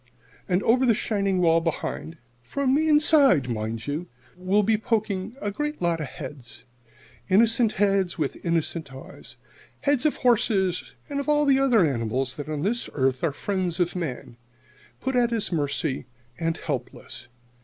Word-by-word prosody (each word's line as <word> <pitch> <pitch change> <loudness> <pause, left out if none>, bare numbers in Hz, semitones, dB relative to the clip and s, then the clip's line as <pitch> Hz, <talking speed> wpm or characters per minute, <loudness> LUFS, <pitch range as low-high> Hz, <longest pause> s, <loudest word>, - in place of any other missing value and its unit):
And 180 +2 +2
over 250 +3 +3
the 235 -4 +4
shining 200 -3 0
wall 165 -1 +4
behind 165 0 -4 0.2
from 260 - -1
the 310 +3 +2
inside, 295 - +5
mind 110 -1 -3
you 150 +5 -3 0.3
will 185 +3 +1
be 220 +2 +3
poking 215 0 -2
a 205 - -2
great 295 +7 -3
lot 170 -1 0
of 150 - -3
heads 130 -2 -9 0.6
innocent 225 +3 +4
heads 195 -3 +1
with 150 -5 -3
innocent 165 -3 -1
eyes 135 0 -11 0.5
heads 285 -1 +2
of 300 - -1
horses 205 -7 +1
and 280 -1 -3
of 280 - -3
all 295 0 +3
the 270 -1 +4
other 245 -9 +4
animals 130 -1 -1
that 145 +1 -6
on 150 -1 -3
this 235 +4 -1
earth 130 -2 0
are - - +4
the 145 - -3
friends 185 0 -2
of 175 0 0
man, 130 -8 -5 0.6
put 265 0 -2
at 240 -1 +3
his 225 -4 -1
mercy 140 -4 -2 0.3
and 165 0 -1
helpless. - - -6
185 Hz, 165 wpm, -25 LUFS, 150-235 Hz, 0.6 s, inside